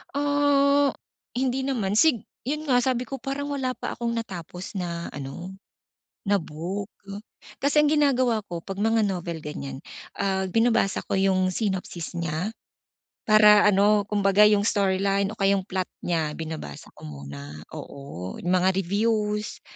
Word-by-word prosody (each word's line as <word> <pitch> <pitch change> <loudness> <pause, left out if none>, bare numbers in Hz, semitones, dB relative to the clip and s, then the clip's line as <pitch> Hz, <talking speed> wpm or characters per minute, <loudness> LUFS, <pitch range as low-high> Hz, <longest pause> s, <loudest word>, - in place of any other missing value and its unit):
Ah, 285 -1 +3 0.4
hindi 265 +1 0
naman 215 -7 0
sig 240 -5 +4 0.2
'yon 300 +2 -1
nga 260 -5 +3
sabi 250 0 0
ko, 270 +1 -6
parang 275 +4 -4
wala 260 -3 -2
pa - - -5
akong 235 0 -2
natapos 185 -5 -6
na, 170 -1 -4
ano, 145 +6 -7 0.8
na 205 - +5
book. 180 +4 -5 0.6
Kasi 290 +2 +3
ang 300 - +3
ginagawa 255 -7 +2
ko 170 -3 -6
'pag 195 +3 -7
mga 225 +2 +2
novel, 175 -5 -2
ganyan, 140 -3 -6 0.3
ah, 190 -1 0
binabasa 225 0 +2
ko - - +1
yung 190 -1 +2
sinopsis 185 -4 -3
niya. 170 +4 -2 0.7
Para 210 -1 +7
ano, 205 +1 +4
kumbaga 200 0 +4
yung 205 -1 +3
storyline, 195 -1 +1
o 220 - -10
kaya 195 0 +3
'yong 195 - 0
plot 185 -1 -3 0.2
niya, 160 -3 -1
binabasa 155 - -7
ko - - -12
muna, 70 +1 -9
oo, 140 -10 -8
mga 185 +1 +2
reviews, 210 +3 -1
200 Hz, 145 wpm, -25 LUFS, 175-235 Hz, 0.8 s, Para